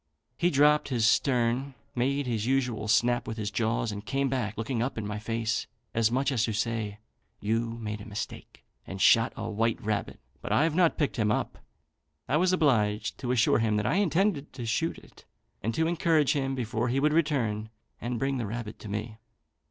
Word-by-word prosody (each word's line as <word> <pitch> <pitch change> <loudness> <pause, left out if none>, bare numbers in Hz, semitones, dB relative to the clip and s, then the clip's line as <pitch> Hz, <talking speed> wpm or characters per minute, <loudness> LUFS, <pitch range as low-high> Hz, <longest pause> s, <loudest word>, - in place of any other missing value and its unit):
He 175 - +2
dropped 150 0 +4
his 120 -4 +1
stern, 125 +2 +2 0.2
made 135 +3 0
his 115 -3 -1
usual 125 -5 0
snap 120 +3 +2
with 110 - -4
his 105 -2 -3
jaws, 115 0 0
and 105 0 -6
came 135 +4 0
back 120 -6 -2
looking 115 +1 -2
up 125 +1 -2
in 110 - -3
my 105 +1 -4
face, 115 +1 -2 0.3
as 115 -1 +3
much 135 +4 +1
as 120 -5 +1
to 110 - -2
say, 110 -1 -2 0.4
'You've 115 +2 -1
made 105 -2 -4
a - - -9
mistake, 105 0 -7 0.2
and 95 - -6
shot 115 +5 +5
a 115 - -4
white 115 +1 0
rabbit, 105 -1 -3 0.2
but - - -5
I've 160 +1 +3
not 170 -1 +3
picked 145 -4 0
him 110 -2 +2
up.' - - -2 0.7
I 150 - +2
was 180 +3 +3
obliged 115 - +1
to 125 -2 -2
assure 120 -2 +3
him 110 -2 +1
that 105 0 0
I 135 - +2
intended 185 -5 +1
to 120 - -6
shoot 160 +9 -1
it, - - -17 0.4
and 115 - -1
to 160 - +2
encourage 165 -3 +2
him 135 -2 -1
before 120 -1 -1
he 130 +3 +1
would 150 +2 +2
return 120 -10 0 0.3
and 120 0 -2
bring 135 +2 -1
the 115 - -2
rabbit 110 0 -6
to 105 - -9
me. 110 +2 -4
120 Hz, 200 wpm, -28 LUFS, 110-140 Hz, 0.7 s, shot